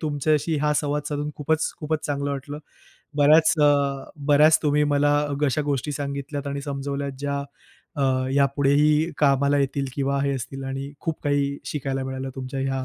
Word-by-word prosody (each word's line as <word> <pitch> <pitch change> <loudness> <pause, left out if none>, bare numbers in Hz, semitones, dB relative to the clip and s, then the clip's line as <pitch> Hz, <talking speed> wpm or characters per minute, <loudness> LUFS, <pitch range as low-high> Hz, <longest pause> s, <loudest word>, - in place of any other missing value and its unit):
तुमच्याशी 155 +1 0
हा 150 0 +2
संवाद 145 0 -1
साधून 145 0 -3
खूपच 155 +2 0
खूपच 155 0 -2
चांगलं 140 -1 -2
वाटलं. 140 +2 -5 0.6
बऱ्याच 155 +2 +6
अ, 145 - +6 0.6
बऱ्याच 150 +2 +6
तुम्ही 150 0 +2
मला 145 +1 +3 0.3
अशा 145 +3 0
गोष्टी 140 +2 -1
सांगितल्यात 140 0 -4
आणि 140 0 -3
समजवल्यात 140 0 -4
ज्या 140 0 -2 0.6
अ, - - +1 0.3
यापुढेही 145 +3 +3
कामाला 140 0 +3
येतील 140 0 0
किंवा 140 0 0
हे 140 0 +1
असतील 135 +2 -6
आणि 135 +1 -5
खूप 160 -1 -3
काही 140 -1 +1
शिकायला 135 -2 -3
मिळालं 130 0 -4
तुमच्या 130 +1 -4
ह्या 135 -1 -1
140 Hz, 155 wpm, -24 LUFS, 140-150 Hz, 0.6 s, बऱ्याच